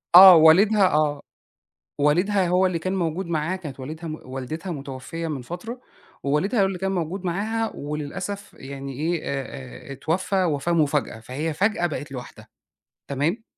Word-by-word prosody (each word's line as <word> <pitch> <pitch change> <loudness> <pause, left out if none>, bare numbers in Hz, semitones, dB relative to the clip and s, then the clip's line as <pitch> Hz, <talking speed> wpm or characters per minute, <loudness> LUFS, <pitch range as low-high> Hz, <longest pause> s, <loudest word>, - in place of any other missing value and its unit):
آه، 185 0 +12
والدها 190 +6 +6
آه، 150 -1 +1 0.8
والدها 180 +7 +3
هو 180 +2 +3
اللي 180 -2 0
كان 185 +4 -2
موجود 175 0 -1
معاها 170 +2 -1
كانت 150 -7 -8
والدها 160 +5 -6
م 155 - -4
والدتها 135 +8 -5
مُتوفيّة 140 +3 -6
من 145 -5 -4
فترة 180 - -7 0.4
ووالدها 165 - +1
هو - - +4
اللي 190 -1 -3
كان 190 +1 -1
موجود 180 +1 -3
معاها 220 +6 -1
وللأسف 165 +8 -5
يعني 135 0 -7
إيه، 160 +5 -1
آآ 135 -1 -6
آآ - - -4
اتوفّى 180 +7 0
وفاة 160 0 0
مفاجأة، 150 -7 +1
فهي 145 +8 -3
فجأة 195 +1 +1
بقت 150 -3 -5
لوحدها، 125 -2 -9 0.6
تمام؟ 150 - -1
165 Hz, 155 wpm, -24 LUFS, 145-190 Hz, 0.8 s, آه